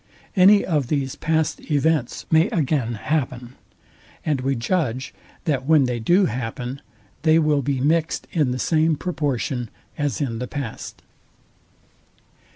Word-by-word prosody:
Any 200 +2 +6
of 150 -7 0
these 135 -1 -1
past 160 0 -1
events 150 -3 0
may 160 +2 +4
again 135 -7 0
happen; 125 -1 -2 0.7
and 145 -4 0
we 135 +1 0
judge, 130 -1 -1 0.3
that 135 -4 -1
when 155 -3 +5
they 125 -2 -1
do 175 - +3
happen, 125 +2 -4 0.4
they 160 +1 +4
will 150 -3 +2
be 135 0 -1
mixed 160 +4 +1
in 150 -6 +1
the 125 - -2
same 160 +3 +2
proportion 140 -7 -2 0.3
as 145 -1 -1
in 120 -6 -2
the 125 - -4
past. 135 -5 -6
145 Hz, 135 wpm, -22 LUFS, 125-160 Hz, 0.7 s, Any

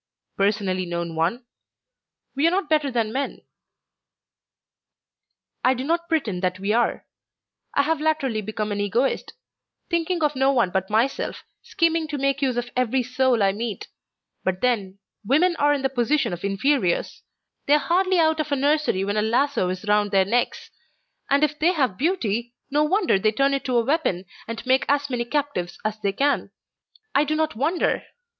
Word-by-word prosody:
"Personally 195 -2 0
known 170 -1 -4
one? 180 +10 -1 0.9
We 285 +4 +3
are - - +5
not 370 +2 0
better 300 -3 +2
than 230 -3 -1
men." 275 +1 -3 2.2
"I 255 +1 +4
do 255 - -4
not 335 +4 -1
pretend 235 - -1
that 185 -1 0
we 200 +3 -1
are. 240 +1 0 0.7
I 280 - +4
have 315 +1 0
latterly 290 -8 0
become 215 0 -4
an 205 0 -1
Egoist, 235 +7 0 0.6
thinking 340 0 0
of 295 -1 +1
no 265 +1 +3
one 235 -9 +2
but 190 +1 -1
myself, 230 +6 0 0.2
scheming 335 -7 0
to 300 -2 -4
make 275 0 0
use 260 -3 0
of 245 0 -3
every 255 +1 +1
soul 250 -2 +1
I 195 - +4
meet. 220 +1 -5 0.5
But 190 0 -1
then, 205 -6 0 0.3
women 315 - +3
are 290 0 +3
in 285 -2 0
the - - +4
position 250 -2 +1
of 175 - -7
inferiors. 200 0 0 0.5
They 285 - +5
are - - +5
hardly 370 +4 +1
out 320 -1 +3
of 305 - -1
the 285 - +1
nursery 285 -8 +1
when 205 +1 -1
a - - +3
lasso 235 -2 +1
is 185 +3 -5
round 210 0 +2
their 195 -1 +3
necks; 235 +5 -1 0.6
and 280 +2 +3
if 300 0 0
they 345 +4 +3
have 260 - 0
beauty, 240 - -1 0.2
no 295 +1 +3
wonder 350 - +2
they 215 +2 +2
turn 275 +4 +2
it 275 - -2
to 250 -3 +1
a 230 - +2
weapon 255 - 0 0.2
and 230 +2 -6
make 260 +1 +3
as 285 0 +1
many 240 -1 -1
captives 245 -10 -2
as 215 0 -2
they 200 -2 0
can. 280 +8 0 0.6
I 285 - +4
do 305 +1 -1
not 315 -3 0
wonder! 310 +9 0
255 Hz, 180 wpm, -23 LUFS, 210-295 Hz, 2.2 s, are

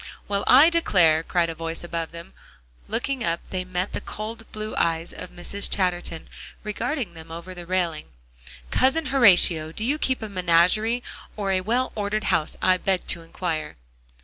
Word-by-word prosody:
"Well, 200 0 0
I 285 +7 +8
declare!" 175 - +4
cried 170 0 0
a - - -6
voice 165 +1 -5
above 170 -1 -3
them, 170 0 -11
and - - -25
looking 270 -3 -1
up 170 -4 0
they 185 -1 -2
met 185 +1 -3
the - - -3
cold 225 +1 -7
blue 215 0 -5
eyes 165 0 0
of - - -7
Mrs. 200 +3 -3
Chatterton 175 -4 -1 0.4
regarding 225 - -3
them 160 0 -11
over 170 +3 -7
the 175 -1 -10
railing. 175 -4 -1 0.6
"Cousin 295 +5 +3
Horatio, 175 - +5
do 215 +6 -3
you 290 +5 0
keep 260 -5 0
a - - -3
menagerie, 190 +6 +2 0.3
or 200 -2 -1
a 185 -1 +2
well 240 +6 0
ordered 210 0 -2
house, 155 - 0
I 185 0 +5
beg 190 0 -1
to 170 - -1
inquire?" 165 -2 -4
185 Hz, 175 wpm, -24 LUFS, 165-215 Hz, 0.6 s, I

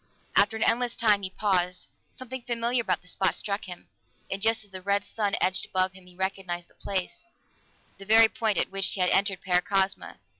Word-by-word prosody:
After 205 +2 +4
an 220 - 0
endless 240 +1 +1
time, 210 -3 +3
he 190 - -2
paused; 180 -2 0 0.3
something 255 0 -7
familiar 235 +1 -1
about 195 -5 -1
the - - -18
spot 190 +1 0
struck 200 0 -3
him, 180 -2 -10 0.4
and 195 - -3
just 225 0 +2
as 200 - -21
the 185 -1 -7
red 200 +1 0
sun 205 -3 -2
edged 185 0 +1
above 185 0 +1
him, 185 -1 -16
he 180 - -17
recognized 185 -2 -3
the - - -26
place 190 - -4 0.8
the 195 - -10
very 225 +2 +7
point 220 -3 -1
at - - +1
which 195 -1 +1
he - - -6
had 180 0 +3
entered 195 -1 +1
Paracosma! 190 +1 0
195 Hz, 200 wpm, -27 LUFS, 185-220 Hz, 0.8 s, very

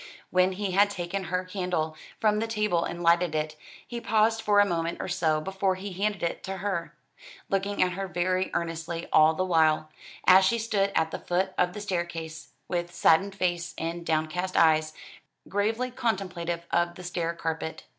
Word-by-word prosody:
When 185 +1 +3
he 200 0 -3
had 200 +2 +4
taken 190 0 -4
her 180 +2 -2
candle 180 -4 -2 0.2
from 210 -1 +2
the 225 - -1
table 210 -6 +1
and 175 0 -5
lighted 170 -1 +3
it, 155 0 -2 0.3
he 240 -1 -6
paused 225 +1 +2
for 205 -1 +3
a 205 - +6
moment 170 -3 -1
or - - -3
so 165 -4 +1
before 190 +3 -1
he 190 +1 -6
handed 205 +1 -1
it 170 - -2
to 190 0 -4
her, 190 -3 -3 0.5
looking 195 +1 +1
at 180 - 0
her 195 +2 -4
very 185 +2 0
earnestly 165 0 -3
all 155 +1 +6
the 185 - 0
while, 155 -3 +2 0.3
as 190 +1 +8
she 195 +5 +3
stood 210 -3 0
at 160 0 +2
the - - -4
foot 185 +2 -1
of 180 0 +1
the 210 - -6
staircase, 170 -4 -4 0.2
with 175 -1 -2
saddened 190 +3 +3
face 175 -2 -1
and 170 +1 -3
downcast 160 +3 -1
eyes, 155 -1 +4 0.5
gravely 220 +5 0
contemplative 185 -8 -2
of 175 0 +1
the 180 - -10
stair 170 -1 -2
carpet. 160 -1 -4
180 Hz, 180 wpm, -27 LUFS, 170-195 Hz, 0.5 s, as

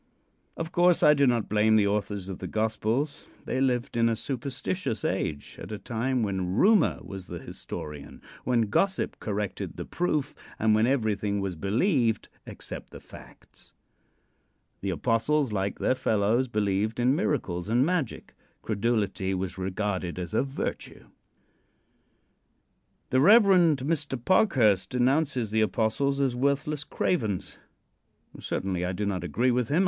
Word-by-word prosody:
Of 165 +1 -4
course, 175 0 +3
I 150 - +8
do 140 -2 +3
not 120 -3 +1
blame 110 +1 +3
the 105 -2 +4
authors 100 -1 -2
of 95 -2 -6
the - - -5
gospels. 110 +6 -1 0.2
They 130 - -1
lived 125 -3 0
in' 115 0 +3
a 115 - +1
superstitious 135 - -3
age, 80 -6 -3
at - - -8
a 105 - -3
time 120 +4 -1
when 95 -3 -2
Rumor 205 - +4
was 95 -2 -8
the 90 - -6
historian, 75 -3 -8 0.2
when 120 -1 +2
Gossip 195 - 0
corrected 105 -1 -4
the - - -5
"proof," 150 -5 -1 0.2
and 110 0 +3
when 110 +2 +3
everything 105 -6 0
was 95 -2 -3
believed 115 - +1 0.2
except - - -8
the - - -11
facts. - - -15 1.1
The 100 - -3
apostles, 115 - +1
like 100 0 -1
their - - +2
fellows, 110 +1 +1
believed 105 0 -1
in 125 +3 +3
miracles 105 - -1
and 120 +4 +3
magic. 170 - -2 0.3
Credulity 105 -3 -1
was 95 0 -4
regarded 95 -2 -2
as 90 0 -5
a - - +3
virtue. 135 0 -5 2.0
The 130 - +3
Rev. 215 +9 +8
Mr. 155 -6 +2
Parkhurst 120 - +3
denounces 130 -2 +1
the 110 0 +2
apostles 115 +6 0
as 135 -3 +1
worthless 140 +3 0
cravens. 110 - -2 0.8
Certainly 95 -2 -2
I 90 +1 -1
do 105 +3 -2
not 95 -3 -2
agree 120 - +1
with 125 -2 0
him. 155 - +2
115 Hz, 145 wpm, -27 LUFS, 100-140 Hz, 2.0 s, I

